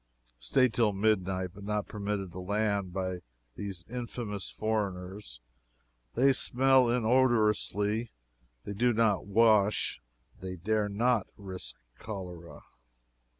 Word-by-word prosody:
Staid 120 - +2
till 110 -4 +2
midnight, 95 -3 0
but 100 0 -11
not 105 0 -1
permitted 100 -3 -3
to 90 - -8
land 100 0 -1
by 95 -1 -3 0.4
these 95 -2 -6
infamous 115 -4 -5
foreigners. 100 - -3 0.8
They 135 +3 +5
smell 130 0 +4
inodorously 110 -3 +2 0.5
they 100 - -5
do 120 +4 +2
not 110 -4 +2
wash 105 - +3 0.4
they 95 0 -5
dare 105 +4 0
not 115 +1 +1
risk 95 -2 -7 0.2
cholera. 90 -5 -8
105 Hz, 110 wpm, -30 LUFS, 95-115 Hz, 0.8 s, They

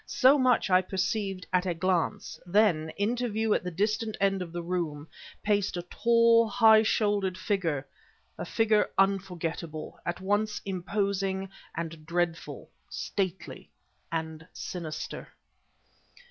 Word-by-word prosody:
So 275 +3 +5
much 250 -6 +3
I 185 0 +6
perceived 190 0 -2
at 180 +1 +2
a 175 - 0
glance; 170 -2 -1
then, 175 -5 +3
into 240 +4 0
view 220 0 +1
at - - 0
the 180 - -3
distant 215 +5 -1
end 195 -1 +2
of 175 -2 -5
the 175 0 -5
room, 165 -4 -3 0.4
paced 205 -3 +1
a 175 - -3
tall, 230 +3 +4
high 220 -2 +6
shouldered 205 -4 +1
figure 170 -9 -1 0.5
a - - -5
figure 220 -2 +2
unforgettable, 175 -5 -1
at 175 - -3
once 205 +2 0
imposing 195 0 -1 0.3
and 165 -1 -5
dreadful, 170 -1 -2 0.2
stately 190 -2 -4 0.4
and 160 0 -4
sinister. 165 -4 -6
190 Hz, 125 wpm, -28 LUFS, 175-210 Hz, 0.5 s, I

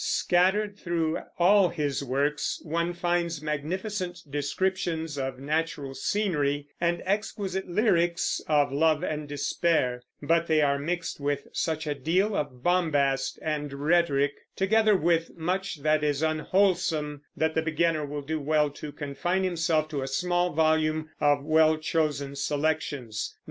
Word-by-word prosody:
Scattered 200 +3 +2
through 165 -2 -1 0.2
all 190 +1 +5
his 145 -5 -2
works 140 +3 -1
one 170 +2 -1
finds 175 -2 -1
magnificent 180 +5 -3
descriptions 160 +2 -2
of 135 -2 -3
natural 150 0 -2
scenery, 145 -6 0 0.2
and 170 0 0
exquisite 195 -1 -2
lyrics 175 -3 +1
of 145 -3 +3
love 155 +3 +2
and 150 -3 -3
despair; 145 -3 0 0.2
but 165 +3 +1
they 155 -1 +3
are 140 -1 +2
mixed 170 +3 -3
with 140 0 -1
such 160 -1 -1
a 150 - -1
deal 180 +9 +1
of 130 -6 -3
bombast 145 -7 +1
and 150 -2 -2
rhetoric, 145 -1 +2 0.2
together 215 +2 +3
with 165 -1 0
much 180 -2 -2
that 155 0 +2
is 145 0 0
unwholesome, 160 -2 +1 0.2
that 160 0 +1
the 160 - +1
beginner 160 0 +1
will 145 0 -5
do 155 +2 -2
well 150 0 +1
to 150 +1 -8
confine 155 +7 -2
himself 165 -3 +1
to 150 -3 -3
a 135 - -3
small 175 +5 0
volume 155 0 +1
of 145 -1 +2
well 155 0 +4
chosen 150 -3 -1
selections. 145 -5 -2
155 Hz, 140 wpm, -27 LUFS, 145-175 Hz, 0.2 s, all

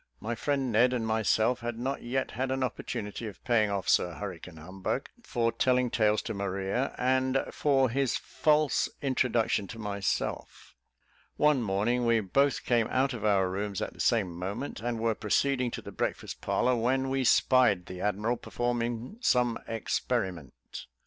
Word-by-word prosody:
My 115 +2 -3
friend 135 +2 -1
Ned 120 +4 +4
and 120 -3 -1
myself 110 +2 +2
had 120 -1 -4
not 130 +4 -3
yet 130 +2 -2
had 130 +3 -2
an 130 0 0
opportunity 110 -3 -4
of 105 - -10
paying 110 -4 +2
off 100 -2 -2
Sir 90 -2 +2
Hurricane 90 -4 -7
Humbug 95 - -4
for 120 - 0
telling 125 +1 +2
tales 110 -2 +2
to 110 - -4
Maria, 100 +5 -2
and 130 +1 +1
for 135 -3 +2
his 135 +1 0
false 150 -1 +1
introduction 120 -6 +1
to 115 - -9
myself. 100 -3 -3 0.6
One 150 -3 +4
morning 115 +4 0
we 115 -1 +4
both 135 +8 +1
came 120 -3 +2
out 135 +1 +1
of 115 -3 -6
our 100 -3 +3
rooms 100 +1 -3
at - - -4
the - - -19
same 105 -7 +2
moment, 100 +11 -4
and 120 +1 -3
were 115 0 +1
proceeding 125 +4 +1
to - - -7
the - - -8
breakfast - - -3
parlour, 125 0 +1
when 130 +3 0
we 135 0 +1
spied 120 -7 +4
the 90 0 -8
admiral 105 +4 0
performing 120 - -3
some 125 - +2
experiment. 95 - -3
115 Hz, 160 wpm, -29 LUFS, 105-130 Hz, 0.6 s, Ned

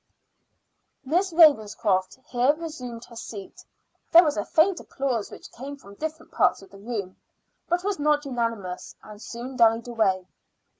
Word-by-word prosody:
Miss 355 +7 +1
Ravenscroft 220 - +4
here 255 +4 +2
resumed 255 -8 -7
her 235 - -15
seat. 210 -4 -9 0.5
There 340 +1 +9
was 300 -3 0
a 205 - -1
faint 345 - +3
applause 255 -6 -2
which - - -12
came 275 +4 -8
from 200 -7 -14
different 315 +7 -6
parts - - +2
of 195 - -16
the 195 - -13
room, 205 -4 -5 0.5
but 350 +1 +1
was 400 -4 -1
not 295 0 +2
unanimous, 230 -8 -3
and 210 0 -12
soon 245 +3 -7
died 230 0 +4
away. 200 -6 +1
245 Hz, 150 wpm, -25 LUFS, 210-300 Hz, 0.5 s, There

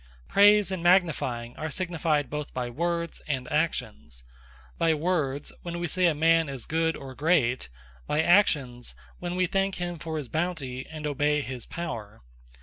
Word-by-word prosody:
Praise, 205 -1 +6
and 185 -2 -2
Magnifying 160 -10 +2
are 155 - -3
significant 155 -5 0
both 150 0 -5
by 125 -1 -2
Words, 170 +4 -2
and 130 -4 -2
Actions: 150 - -2 0.6
By 165 -1 +3
Words, 150 -4 -1
when 170 0 -5
we 175 0 -2
say 180 +2 +2
a 165 - +2
man 165 0 +4
is 135 -4 -6
Good, 160 0 +1
or 135 -1 -8
Great: 135 - +2 0.4
By 155 +2 +2
Actions, 140 - +2 0.2
when 175 0 -3
we 185 0 +2
thank 195 +2 0
him 175 -2 -4
for 160 0 -4
his 145 -4 -4
Bounty, 145 -5 -3
and 155 -1 -7
obey 150 +1 +1
his 125 -2 -6
Power. 110 - -6
155 Hz, 160 wpm, -27 LUFS, 135-175 Hz, 0.6 s, Praise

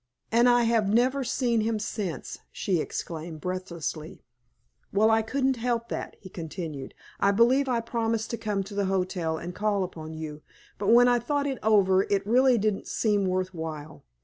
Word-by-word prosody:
"And 235 +2 +5
I 240 0 +4
have 225 -3 +2
never 255 +5 +2
seen 240 -2 +1
him 220 0 0
since!" 195 - -4
she 180 -5 0
exclaimed, 160 0 -5
breathlessly. 170 -3 -5 0.7
"Well, 215 +3 +4
I 225 0 +4
couldn't 265 +3 0
help 235 0 -1
that," - - -5
he 190 - -11
continued. 160 -5 -6 0.2
"I 200 - +3
believe 245 +6 +3
I 235 -2 +1
promised 230 -1 -2
to 235 - -2
come 210 -3 -2
to 195 +2 -10
the 200 0 0
hotel 180 -4 -1
and 175 +2 -6
call 205 -1 0
upon 160 -3 -7
you, 155 -1 -7 0.4
but 200 - -2
when 240 +3 +7
I 245 -1 +4
thought 285 +4 -1
it 270 -3 -2
over 195 -3 +4
it 200 -1 +1
really 250 +3 +4
didn't 210 -2 -1
seem 205 -3 +1
worth 185 0 -1
while. 155 -2 -7
205 Hz, 175 wpm, -27 LUFS, 180-235 Hz, 0.7 s, when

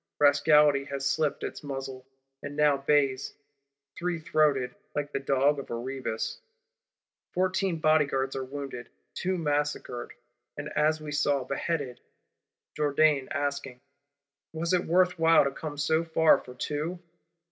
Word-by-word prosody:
Rascality 145 -1 +5
has 140 -1 -4
slipped 150 +1 0
its - - -5
muzzle; 135 -2 -6 0.3
and 140 0 -7
now 150 -1 +4
bays, 140 -1 +1 0.6
three 175 0 -2
throated, 145 -5 +1 0.2
like 145 0 -2
the - - 0
Dog 140 +1 +2
of 140 - -8
Erebus. 120 -1 -4 0.9
Fourteen 185 -1 +1
Bodyguards 145 -4 +2
are 135 - -2
wounded; 135 -3 -7 0.2
two 185 0 -1
massacred, 145 -6 -2 0.4
and 145 +1 -5
as 155 +1 +1
we 155 -1 -7
saw, 145 -2 +1
beheaded; 135 0 -3 0.7
Jourdan 150 -2 +2
asking, 140 -3 -3 0.7
'Was 165 +2 -1
it 180 - +2
worth 180 +1 +2
while 165 0 +6
to 140 - -1
come 150 +1 -7
so 160 +2 +1
far 160 -1 +4
for 125 - -12
two? 150 +7 -3
145 Hz, 130 wpm, -28 LUFS, 135-155 Hz, 0.9 s, while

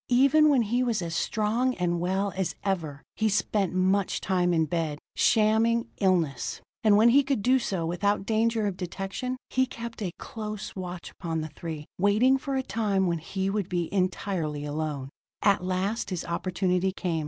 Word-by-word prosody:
Even 275 +5 +5
when 265 -5 +4
he 240 +4 0
was 235 -4 +1
as 165 -1 -4
strong 225 +8 0
and 175 -1 0
well 190 +3 0
as 190 -2 -2
ever, 160 -8 -2
he 220 0 +1
spent 200 -2 +1
much 190 +1 +1
time 180 -2 +1
in 160 -2 +2
bed, 155 -2 -2 0.2
shamming 225 +1 +3
illness. 170 - +1 0.2
And 210 -2 +6
when 225 +3 +6
he 275 +4 +6
could 270 -6 -1
do 260 +3 +4
so 190 -7 -2
without 195 +4 0
danger 225 0 +1
of 195 -3 -2
detection, 195 +8 -4
he 260 0 +2
kept 235 -2 -7
a 185 -4 -2
close 215 -2 -6
watch 180 -2 -6
upon 165 -2 -3
the 155 - -5
three, 155 0 -7
waiting 220 +8 +4
for 275 0 -3
a 265 - 0
time 205 -6 0
when 170 -2 0
he 190 +4 -3
would 195 -2 -1
be 175 -1 -2
entirely 180 -5 -1
alone. 145 -2 -3 0.3
At 200 -3 +3
last 185 +5 -1
his 180 -4 -3
opportunity 180 +2 0
came. 175 -3 -2
195 Hz, 175 wpm, -27 LUFS, 175-225 Hz, 0.3 s, And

